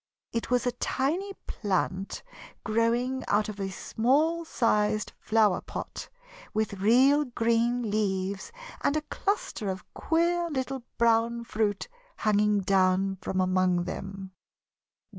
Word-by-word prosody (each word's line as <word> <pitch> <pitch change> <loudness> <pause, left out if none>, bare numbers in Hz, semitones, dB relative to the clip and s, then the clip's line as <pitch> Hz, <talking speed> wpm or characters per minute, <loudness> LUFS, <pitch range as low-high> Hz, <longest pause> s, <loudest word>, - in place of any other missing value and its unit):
It 230 0 -3
was 250 0 +2
a 245 - +2
tiny 300 +10 -1
plant 190 -1 -2 0.4
growing 235 +4 +1
out 210 +1 +2
of 210 -1 -7
a 195 -1 -2
small 290 - +1
sized 215 -6 +1
flower 215 -4 +3
pot, - - -7 0.5
with 210 -3 -1
real 265 +8 +5
green 235 -1 +1
leaves 195 - -1 0.3
and 290 - +2
a - - 0
cluster 405 - -1
of 190 0 -5
queer 340 +1 +1
little 265 -2 -3 0.2
brown 235 0 +2
fruit 215 -3 -1 0.3
hanging 210 -1 +2
down 190 0 +2
from 190 - -2
among 185 -1 +2
them. 195 +1 -6
220 Hz, 120 wpm, -28 LUFS, 195-255 Hz, 0.5 s, real